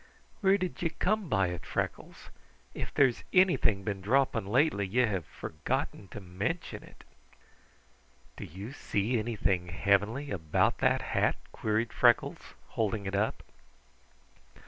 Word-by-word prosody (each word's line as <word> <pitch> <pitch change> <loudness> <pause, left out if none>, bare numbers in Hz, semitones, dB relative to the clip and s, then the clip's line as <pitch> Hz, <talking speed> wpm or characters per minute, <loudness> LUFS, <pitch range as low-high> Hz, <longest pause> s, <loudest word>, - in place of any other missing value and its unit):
Where 195 -1 +4
did 185 -2 -4
ye 170 - +1
come 190 +3 -1
by 95 -4 +2
it, 90 -2 -6
Freckles? - - -4 0.4
If - - -5
there's 130 -4 +3
anything 175 - +4
been 100 -1 -3
dropping 115 -1 +1
lately, 115 -3 +2
ye 125 +6 +3
hae 100 -4 0
forgotten 80 +4 -4
to 105 - -8
mention 100 - -4
it." - - -16 1.3
"Do - - -7
you 100 - -8
see 115 -2 -1
anything 100 -5 0
heavenly 100 +9 +1
about 80 -5 +1
that - - +2
hat?" - - +2 0.2
queried 110 +2 -1
Freckles, - - +2
holding 110 -2 -1
it 95 - -3
up. 105 +3 0
110 Hz, 130 wpm, -30 LUFS, 95-135 Hz, 1.3 s, Where